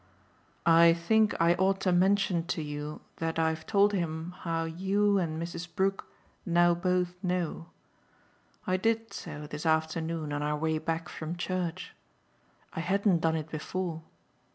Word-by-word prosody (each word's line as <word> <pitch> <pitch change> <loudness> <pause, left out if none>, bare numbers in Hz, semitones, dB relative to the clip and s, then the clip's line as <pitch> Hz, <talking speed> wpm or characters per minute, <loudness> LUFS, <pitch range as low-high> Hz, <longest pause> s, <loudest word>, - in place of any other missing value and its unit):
"I 165 0 +7
think 215 +5 +2
I 170 +1 +5
ought 190 +2 +1
to 185 - +2
mention 185 -1 +2
to 160 - -2
you 150 0 -5 0.2
that 165 0 -2
I've 160 0 0
told 205 0 +4
him 165 -2 -2
how 165 -1 -1
you 195 +5 +1
and 160 -3 -2
Mrs. 170 +1 -5
Brook 195 +1 0 0.4
now 175 0 +4
both 180 0 0
know. 180 -2 -2 1.0
I 185 0 +1
did 225 +3 0
so 150 -3 -7
this 150 0 -6
afternoon 160 -1 0
on 145 - -2
our 150 0 0
way 160 0 0
back 165 +1 -2
from 160 +2 -5
church 180 0 -3 0.8
I - - -4
hadn't 190 +1 +2
done 160 0 +2
it 160 0 -4
before. 165 +1 -3
170 Hz, 150 wpm, -29 LUFS, 160-185 Hz, 1.0 s, I